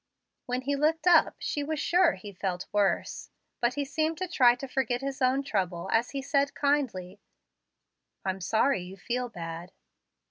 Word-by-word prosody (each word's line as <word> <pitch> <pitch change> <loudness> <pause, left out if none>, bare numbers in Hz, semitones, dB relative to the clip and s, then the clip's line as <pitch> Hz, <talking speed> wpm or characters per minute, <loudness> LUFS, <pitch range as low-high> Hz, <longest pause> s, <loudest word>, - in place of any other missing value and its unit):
When 250 +1 -1
he 280 +2 -1
looked 315 +4 +1
up 345 -3 +5
she 290 - -2
was 305 +1 -3
sure 350 +1 +3
he 200 +2 -10
felt 180 -1 -3
worse. 205 -1 0 0.3
But 240 +1 +1
he 285 -1 -1
seemed 315 +3 -1
to 370 - -3
try 250 -8 +5
to 270 +2 -7
forget 255 -1 -1
his 275 0 -4
own 260 +2 +2
trouble 180 -9 -2
as 230 +2 +2
he 275 -1 -4
said 280 0 +1
kindly, 240 -10 -1 1.1
"I'm 190 0 -2
sorry 220 +4 +2
you 185 +2 -9
feel 245 +6 -3
bad." 170 -1 -7
255 Hz, 170 wpm, -28 LUFS, 195-285 Hz, 1.1 s, up